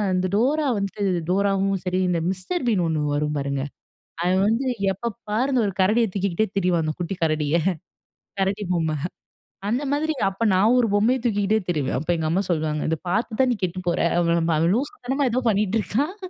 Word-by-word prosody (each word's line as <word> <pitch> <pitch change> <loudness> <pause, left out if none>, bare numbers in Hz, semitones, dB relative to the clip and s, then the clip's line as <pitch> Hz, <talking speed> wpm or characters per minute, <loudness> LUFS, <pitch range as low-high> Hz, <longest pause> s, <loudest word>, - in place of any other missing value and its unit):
இந்த 185 0 +1
டோரா 285 +6 +2
வந்துட்டு, 200 +1 -3 0.3
டோராவும் 195 0 +1
சரி 180 +1 0
இந்த 170 -2 +1
மிஸ்டர் 245 - -3
பீன் 200 -6 +2
ஒண்ணு 155 -2 0
வரும் 150 0 -1
பாருங்க, 140 -1 -2 0.6
அவன் 185 +2 +2
வந்து 230 +5 +1 0.3
எப்ப 230 +5 -4 0.2
பாரு, 230 +6 +1
அந்த 250 - +3
ஒரு 195 - -2
கரடிய 215 +5 +4
தூக்கிகிட்டே 200 +1 0
திரிவான். 180 -3 +2
அந்த 155 - -1
குட்டி 175 +3 -2
கரடிய. 155 -1 +1 0.9
கரடி 195 +2 0
பொம்மை. 160 -3 0 0.7
அந்த 250 +6 0
மாதிரி 310 +2 0 0.2
அப்போ 195 +4 -4
நான் 215 +7 +4
ஒரு 235 - +3
பொம்மைய 235 +5 +3
தூக்கிகிட்டே 210 -1 +2
திரிவேன். 150 -7 0
அப்போ 160 +4 -2
எங்க 160 -1 -1
அம்மா 185 +4 +2
சொல்லுவாங்க, 155 -2 0
"இத 160 - 0
பாத்து 220 +4 -1
தான் 260 - +3
நீ - - +1
கெட்டு 185 +1 -1
போற." 170 - +1 0.2
அப்டிம்பா. 170 -2 +2
அவன் 170 +4 +3
லூசு 285 - -2
தனமா 270 +1 +1
ஏதோ 255 +2 +1
பண்ணீட்டு 210 +1 +1
இருக்கான், 290 - -1
195 Hz, 185 wpm, -23 LUFS, 170-230 Hz, 0.9 s, கரடிய